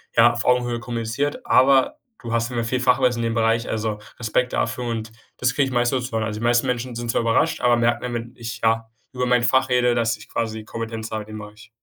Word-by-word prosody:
ja, 120 +1 +6
auf 120 - -3
Augenhöhe 120 -1 +2
kommuniziert. 120 +4 -3
Aber 130 0 +4 0.2
du 115 -2 -5
hast 115 0 +1
auf - - -5
jeden 120 -1 -1
Fall 115 - -4
viel 130 - 0
Fachwissen 125 -2 +2
in 115 - 0
dem - - -3
Bereich. 115 0 +1
Also 110 -1 -2 0.2
Respekt 125 +2 0
dafür." 125 +1 -1
Und 115 -1 -3 0.3
das 125 -1 +1
kriege 140 -2 +2
ich - - -5
meistens 120 +1 +1
so - - -5
zu - - -23
hören. 110 - +1
Also 105 -1 -4
die - - -6
meisten 120 +2 +3
Menschen 125 0 -2
sind 120 0 -2
zwar - - +1
überrascht, 115 +1 +1
aber 120 -1 +4
merken 120 0 +1
dann, 125 -1 -3
wenn 120 0 -5
ich, 115 -1 -6
ja, 115 0 +1 0.2
über 125 0 -1
mein 125 -1 +3
Fach 130 +2 +3
rede, 125 -1 +3
dass 115 -1 +1
ich 110 - -15
quasi 110 -1 -3
Kompetenz 115 0 -5
habe 110 -1 -3
in 110 +1 -12
dem 110 - -6
Bereich. 105 +1 -12
120 Hz, 260 wpm, -22 LUFS, 115-125 Hz, 0.3 s, ja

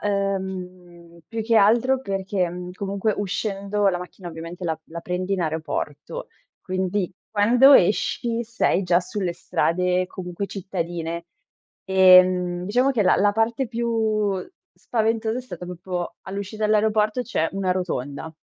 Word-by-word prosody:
ehm, 185 -4 -4
più 225 -1 -3
che 230 +1 +1
altro 235 +6 +4
perché, 195 -4 -1
mhmm, 180 +1 -7
comunque 200 +2 -1
uscendo 200 0 -1
la 185 - +1
macchina 180 0 -9
ovviamente 165 +2 -8
la 160 -2 -1
la 170 +1 -7
prendi 180 +2 -3
in 190 - -2
aeroporto, 160 - -4 0.3
quindi 185 0 -1 0.2
quando 240 +6 +6
esci 230 +3 +3
sei 225 -4 +1
già 175 -2 +3
sulle 185 -1 -3
strade 180 +1 0
comunque 180 +1 -5
cittadine. 170 -3 -4 0.6
Ehm, 185 -1 +5
diciamo 250 +8 +2
che 225 - +2
la 185 - +4
la 205 +1 +3
parte 225 +3 0
più 220 -4 0 0.4
spaventosa 225 0 -1
è 255 - -5
stata 180 -8 -8
proprio 180 0 -5
all'uscita 200 +3 -5
dell'aeroporto, 215 +2 +2
c'è 165 -10 -1
una 195 -1 -1
rotonda 160 -4 -4
190 Hz, 135 wpm, -23 LUFS, 180-215 Hz, 0.6 s, quando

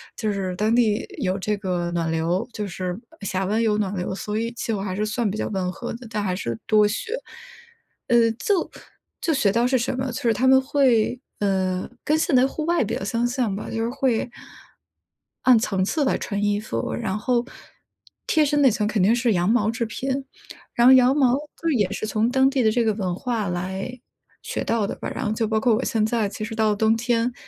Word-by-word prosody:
就 215 -1 -1
是 190 -2 -3
当 215 +4 +1
地 220 -3 +2 0.2
有 185 -4 0
这 210 +2 -1
个 180 -3 -2
暖 165 -1 -1
流， 170 +6 0
就 210 -2 -4
是 185 0 -4 0.2
峡 190 -1 -2
湾 215 +4 +1
有 215 -2 +2
暖 205 -2 -1
流， 180 +1 -3
所 210 +2 -4
以 230 +1 -2
气 230 -1 -3
候 200 - -2
还 190 -2 -3
是 210 +2 -1
算 220 +1 -1
比 200 - -4
较 - - -2
温 185 -3 -2
和 240 +6 -6
的， 240 +1 -9
但 210 -2 -2
还 185 -2 -1
是 115 - -3
多 210 -1 +4
雪， 225 - -3 0.9
呃， 235 -2 +4
就 390 +1 +1 0.5
就 330 - 0
学 245 -9 +2
到 235 +4 +2
是 260 +1 +2
什 240 +1 -1
么？ 260 0 -2
就 240 - -5
是 230 -2 +3
他 255 +4 +1
们 265 0 +7
会， 260 -3 +2 0.2
呃， 190 -2 0 0.2
跟 305 - +2
现 315 -2 +1
代 255 +1 +5
户 305 +3 -4
外 340 -2 +2
比 210 - -2
较 - - -4
相 230 +4 0
像 245 -5 -1
吧， 205 - -6
就 225 - -2
是 230 - -1
会 255 -4 0 1.2
按 250 -3 +6
层 195 -5 0
次 295 +9 0
来 - - +1
穿 200 -1 -3
衣 205 0 +1
服， 115 - -3
然 190 +11 -2
后 240 +2 0 0.8
贴 315 - +3
身 290 0 +1
那 265 - +6
层 210 0 0
肯 215 -3 +1
定 215 +5 +4
是 240 -2 +2
羊 175 -1 +1
毛 220 -2 +2
制 230 +1 -2
品， 265 +4 -3 0.5
然 240 - +4
后 260 - +9
羊 260 +1 +6
毛 260 -4 +4
就 300 +3 -4
是 - - +2
也 205 -6 +2
是 210 - -3
从 220 +2 +1
当 265 +1 +4
地 270 -1 0
的 220 - +4
这 235 +2 +1
个 220 -1 +2
文 185 -4 -2
化 225 -1 -2
来 190 +7 -4 0.5
学 - - -3
到 225 -2 +1
的 - - -3
吧。 - - -5
然 260 - -3
后 210 - 0
就 220 0 -1
包 220 0 +1
括 240 -1 +3
我 245 - -1
现 220 -2 +1
在 220 -1 0
其 215 - -6
实 225 - -6
到 220 -1 +2
了 - - 0
冬 220 +2 +3
天， 240 +1 0
220 Hz, 250 characters per minute, -23 LUFS, 200-245 Hz, 1.2 s, 后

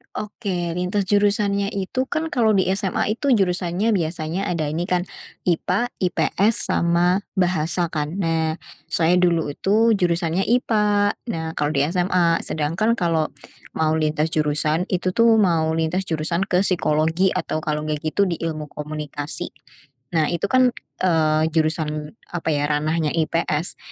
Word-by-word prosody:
Oke, 195 -5 -3
lintas 180 +4 -1
jurusannya 200 -1 +2
itu 255 +7 -2
kan 320 +1 -2
kalau 220 -4 +3
di 190 - +3
SMA 195 +1 0
itu 275 -3 +3
jurusannya 185 +1 0
biasanya 170 0 -2
ada 170 -3 -1
ini 170 +3 -2
kan, 180 -1 +1 0.4
IPA 185 +7 0
IPS 195 +4 +1
sama 175 +2 +2 0.2
bahasa 175 -2 0
kan. 150 +2 -3
Nah, 165 -4 0 0.3
saya 170 +1 +2
dulu 170 -4 +2
itu 215 +9 +2
jurusannya 175 -2 +1
IPA. 210 -4 +2
Nah, 160 -7 -3
kalau 145 -2 -1
di 140 - +3
SMA 175 -2 +2
sedangkan 170 +10 0
kalau 165 -5 +1 0.5
mau 160 -1 +1
lintas 155 +1 0
jurusan 155 +3 +1
itu 185 0 -1
tuh 230 +3 +4
mau 170 -7 +3
lintas 170 +4 -1
jurusan 170 +4 -1
ke 180 0 +2
psikologi 165 0 +2
atau 155 - -2
kalau 150 -1 -2
enggak 155 -1 -2
gitu 200 +6 +1
di 175 -4 -1
ilmu 155 -3 -4
komunikasi. 150 -1 -4 0.6
Nah, 160 -3 +2
itu 175 +3 -2
kan, 255 -1 +4 0.3
eee, 155 -2 +2
jurusan 155 +1 -1 0.2
apa 165 -2 -1
ya 145 -1 +1
ranahnya 150 +1 0
IPS, 165 0 0
170 Hz, 145 wpm, -22 LUFS, 155-195 Hz, 0.6 s, tuh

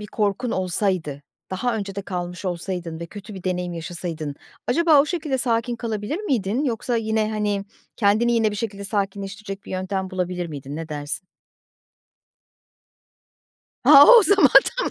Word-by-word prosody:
bir 210 - -7
korkun 210 +3 -1
olsaydı 180 -6 -1 0.3
daha 225 +5 -1
önce 200 -2 -5
de 200 - -4
kalmış 180 -1 -5
olsaydın 175 -2 -4
ve 170 - -5
kötü 205 +3 -10
bir 190 - -9
deneyim 180 -1 -2
yaşasaydın 165 -3 -5 0.3
acaba 315 +2 +5
o 285 - +1
şekilde 305 -5 -2
sakin 240 0 0
kalabilir 225 - -3
miydin 250 - -1
yoksa 240 -1 -1
yine, 220 -1 0
hani, 210 -2 -1 0.3
kendini 220 +3 +3
yine 225 -2 +2
bir 210 - -5
şekilde 200 -2 -4
sakinleştirecek 200 0 -4
bir - - -11
yöntem 190 0 -3
bulabilir 180 -1 -2
miydin? 145 -2 -7
Ne 165 0 -6
dersin? 150 +4 -5 2.6
Ha, 285 +1 +10
o 480 -2 +9
zaman 400 0 +5 0.3
tamam. - - -1
200 Hz, 150 wpm, -23 LUFS, 180-230 Hz, 2.6 s, Ha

